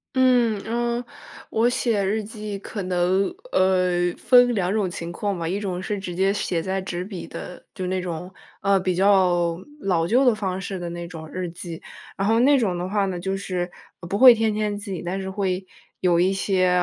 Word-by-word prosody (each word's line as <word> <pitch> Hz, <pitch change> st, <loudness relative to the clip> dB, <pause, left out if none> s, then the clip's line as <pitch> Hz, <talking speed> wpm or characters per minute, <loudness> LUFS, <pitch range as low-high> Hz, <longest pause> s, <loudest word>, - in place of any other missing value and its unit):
嗯， 245 Hz, -5 st, +3 dB
嗯， 240 Hz, +1 st, -1 dB, 0.5 s
我 225 Hz, +2 st, +2 dB
写 230 Hz, -4 st, +1 dB
日 215 Hz, +3 st, 0 dB
记 210 Hz, -2 st, -6 dB
可 205 Hz, 0 st, -6 dB
能， 180 Hz, +1 st, +1 dB, 0.3 s
呃， 180 Hz, -2 st, +2 dB
分 245 Hz, -1 st, +5 dB
两 185 Hz, -3 st, 0 dB
种 205 Hz, -2 st, +1 dB
情 170 Hz, -1 st, -6 dB
况 195 Hz, +1 st, -2 dB
吧， 165 Hz, -, -2 dB
一 190 Hz, +4 st, -1 dB
种 185 Hz, -3 st, -3 dB
是 205 Hz, +2 st, -3 dB
直 190 Hz, -2 st, -5 dB
接 195 Hz, +1 st, +2 dB
写 185 Hz, -4 st, -1 dB
在 190 Hz, +3 st, -2 dB
纸 180 Hz, -1 st, -4 dB
笔 190 Hz, -2 st, -7 dB
的 180 Hz, -, -9 dB
就 185 Hz, -2 st, -4 dB
那 185 Hz, 0 st, -1 dB
种， 180 Hz, 0 st, -5 dB, 0.3 s
呃， 195 Hz, -1 st, +3 dB
比 185 Hz, -1 st, 0 dB
较 180 Hz, -3 st, +3 dB, 0.2 s
老 180 Hz, -, +1 dB
旧 240 Hz, +9 st, +3 dB
的 245 Hz, -4 st, +4 dB
方 190 Hz, -3 st, -3 dB
式 190 Hz, +1 st, -4 dB
的 175 Hz, -1 st, -5 dB
那 170 Hz, 0 st, -6 dB
种 160 Hz, -2 st, -9 dB
日 185 Hz, -1 st, -3 dB
记。 170 Hz, -1 st, -8 dB, 0.3 s
然 195 Hz, -, -1 dB
后 225 Hz, +1 st, +3 dB
那 275 Hz, +1 st, +5 dB
种 190 Hz, -6 st, 0 dB
的 180 Hz, +1 st, -3 dB
话 200 Hz, 0 st, +1 dB
呢， 180 Hz, -2 st, -3 dB
就 190 Hz, +2 st, -2 dB
是 180 Hz, -2 st, -3 dB, 0.4 s
不 195 Hz, -, -2 dB
会 255 Hz, -2 st, +10 dB
天 220 Hz, -1 st, +1 dB
天 210 Hz, -1 st, -1 dB
记， 200 Hz, -3 st, -5 dB
但 180 Hz, +2 st, -3 dB
是 190 Hz, 0 st, -4 dB
会 190 Hz, -1 st, -2 dB, 0.3 s
有 175 Hz, -2 st, +3 dB
一 185 Hz, +2 st, +3 dB
些， 190 Hz, -1 st, +1 dB
190 Hz, 215 characters per minute, -23 LUFS, 180-210 Hz, 0.5 s, 会